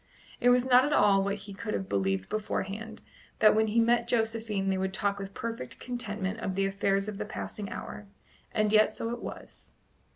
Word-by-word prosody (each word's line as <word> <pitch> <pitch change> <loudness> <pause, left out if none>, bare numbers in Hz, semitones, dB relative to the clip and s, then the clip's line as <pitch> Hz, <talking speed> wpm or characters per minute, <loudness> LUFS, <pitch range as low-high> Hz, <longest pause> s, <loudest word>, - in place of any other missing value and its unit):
It 245 - +4
was 245 0 +4
not 255 0 +6
at 295 +2 0
all 195 -5 +5
what 200 0 0
he 200 - -8
could 195 - -4
have 95 -1 -3
believed 95 -1 0
beforehand, 215 +1 -4 0.3
that 215 - +6
when 220 0 +3
he 220 +2 +2
met 235 +1 +3
Josephine 220 -4 0
they 190 - 0
would 190 0 -1
talk 200 0 0
with 195 0 -7
perfect 230 - -5
contentment 215 -4 -4
of 190 -4 -3
the 195 0 +1
affairs 195 0 0
of 210 -1 -5
the - - -1
passing 210 -1 -6
hour; 210 - -7 0.4
and 215 0 +1
yet 215 0 +6
so 230 - -4
it 240 - -5
was. - - -9
210 Hz, 200 wpm, -29 LUFS, 195-225 Hz, 0.4 s, not